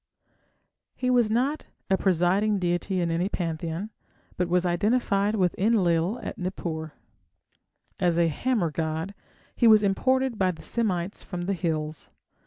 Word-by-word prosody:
He 255 -1 0
was 240 -3 +3
not 260 +7 0 0.2
a 190 - +3
presiding 190 +3 +2
deity 180 +1 -1
in 170 -1 0
any 175 +4 0
pantheon, 170 +3 -3 0.4
but 180 -1 -1
was 180 +1 +2
identified 205 +2 +1
with 185 -4 +2
Enlil 190 -1 +2
at - - -6
Nippur. 160 -4 -4 1.1
As 175 -3 +2
a 170 -1 +4
hammer 185 - 0
god, 160 +4 -3 0.4
he 235 - +4
was 215 -1 +7
imported 260 +4 +1
by 190 -1 +3
the 165 -3 -6
Semites 195 -5 -1
from 180 -2 -5
the 195 +3 -1
hills. 155 -3 -3
185 Hz, 140 wpm, -26 LUFS, 170-215 Hz, 1.1 s, was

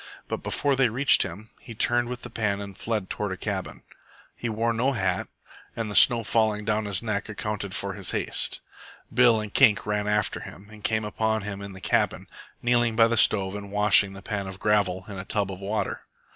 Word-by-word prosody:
But - - -4
before 140 -1 0
they 130 -2 +3
reached 130 +6 +5
him, 100 +4 -5
he 115 - -11
turned 120 +2 +2
with 125 -1 -6
the 120 - -8
pan 105 -3 -1
and 100 -1 -8
fled 110 -3 -3
toward 105 0 -3
a 95 - -4
cabin. 95 - -4 0.5
He 120 - -4
wore 115 +2 0
no 125 +4 +1
hat, 95 -6 -1 0.5
and 110 -2 -3
the - - -6
snow 120 -2 +6
falling 105 0 +1
down 105 0 0
his 100 0 -3
neck 105 -1 -2
accounted 105 -2 -4
for 100 -1 -2
his 95 -1 -4
haste. - - -1 0.5
Bill 120 -2 +5
and 105 -1 -6
Kink 115 -7 +5
ran 105 0 -1
after 105 -1 0
him, 100 +3 -11
and 105 -1 -14
came 110 -1 0
upon 110 0 -1
him 100 -1 -6
in 100 -1 -8
the 95 - -11
cabin, - - 0 0.4
kneeling 120 -1 +2
by 115 0 +6
the 115 - 0
stove 100 -3 +3
and 100 -1 -7
washing 100 -2 +4
the 95 0 -11
pan 100 -1 -3
of 95 0 -7
gravel 95 -4 +1
in 100 -3 -7
a - - -5
tub 100 -1 0
of 95 0 -8
water. 105 +2 -2
105 Hz, 215 wpm, -26 LUFS, 100-115 Hz, 0.5 s, snow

